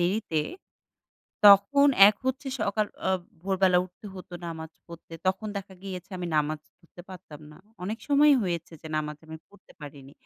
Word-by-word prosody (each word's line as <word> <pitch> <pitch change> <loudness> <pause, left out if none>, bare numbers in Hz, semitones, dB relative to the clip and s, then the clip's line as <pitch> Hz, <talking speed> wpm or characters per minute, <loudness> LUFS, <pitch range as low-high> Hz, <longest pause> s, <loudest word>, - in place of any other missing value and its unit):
দেরিতে, 175 -3 0 1.1
তখন 205 +9 +7 0.2
এক 210 - +1
হচ্ছে 260 +1 -2
সকাল 215 0 0 0.2
আ - - +2 0.3
ভোরবেলা 190 -1 +2
উঠতে 185 +5 -14
হতো 185 -1 -11
নামাজ 160 -1 -7 0.2
পড়তে 170 0 -12
তখন 190 +3 0
দেখা 195 -1 -7
গিয়েছে 185 -1 -8
আমি 180 - -4
নামাজ 150 0 0 0.2
পড়তে 175 0 -16
পারতাম 180 -5 -11
না। 150 - -16 0.2
অনেক 210 +5 -4
সময়ই 290 0 +5
হয়েছে 170 -3 -3
যে 160 - -8
নামাজ 150 0 -3
আমি 160 0 -8
পড়তে 205 -1 -21
পারিনি। 140 -2 -11
185 Hz, 160 wpm, -27 LUFS, 160-205 Hz, 1.1 s, তখন